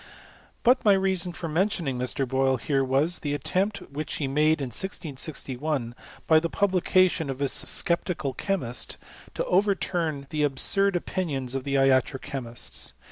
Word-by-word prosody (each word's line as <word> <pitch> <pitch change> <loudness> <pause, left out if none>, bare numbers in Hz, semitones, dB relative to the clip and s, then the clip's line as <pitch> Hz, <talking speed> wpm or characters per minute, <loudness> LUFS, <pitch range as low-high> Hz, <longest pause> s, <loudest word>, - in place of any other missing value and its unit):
But 255 +2 +4
my 205 - +6
reason 190 -2 +1
for 170 0 -6
mentioning 165 -4 0
Mr. 130 +2 -1
Boyle 130 +1 +1
here 135 +2 0
was, 140 +7 +1
the 145 -1 -2
attempt 195 +7 -1
which 150 +2 -4
he 145 - -2
made 150 +3 +2
in 135 -3 -3
1661, 140 - -3 0.3
by 160 -1 +5
the 170 +1 -2
publica 185 -1 +3
tion 160 -5 -3
of 135 - -3
his 140 -1 +1
Sceptical 170 -6 +1
Chemist, 130 - -1 0.4
to - - -1
overturn 180 -6 0
the 155 - -1
absurd 195 +7 +2
0|Hnions 135 -9 -3
of 135 -1 -3
the 140 -1 -1
iatro 135 0 +3
chemists. 130 -5 -2
150 Hz, 150 wpm, -26 LUFS, 135-180 Hz, 0.4 s, my